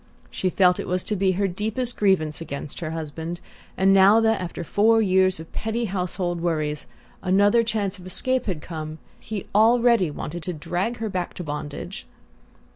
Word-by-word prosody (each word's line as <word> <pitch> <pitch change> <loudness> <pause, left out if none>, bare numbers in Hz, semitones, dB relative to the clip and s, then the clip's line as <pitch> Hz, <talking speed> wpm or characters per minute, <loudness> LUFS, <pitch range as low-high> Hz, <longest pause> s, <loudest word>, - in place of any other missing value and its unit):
She 185 - -1
still 180 0 +4
felt - - -11
it 180 +1 -1
to 210 - 0
be 190 -1 +2
her 200 +2 +1
deepest 220 +6 -2
grievance 175 -7 +1
against 145 -2 -6
her 165 - -4
husband; 160 +2 -5 0.4
and 190 +1 +4
now 195 +3 +7
that, 225 -3 +2
after 175 -1 -5
four 220 +6 +3
years 185 -4 +3
of 160 - -11
petty 225 +2 -2
household 180 -3 -2
worries, 155 -3 -1 0.3
another 205 +5 +4
chance 210 -4 -2
of 180 - -11
escape 255 +7 -1
had 175 -6 -3
come, 155 -2 -6 0.2
he 210 -3 -5
already 230 -3 +4
wanted 160 +3 -6
to 180 +3 -4
drag 180 +9 -2
her 225 - -3
back 180 -2 -3
to 180 - -5
bondage! 150 +4 -6
185 Hz, 175 wpm, -24 LUFS, 165-210 Hz, 0.4 s, now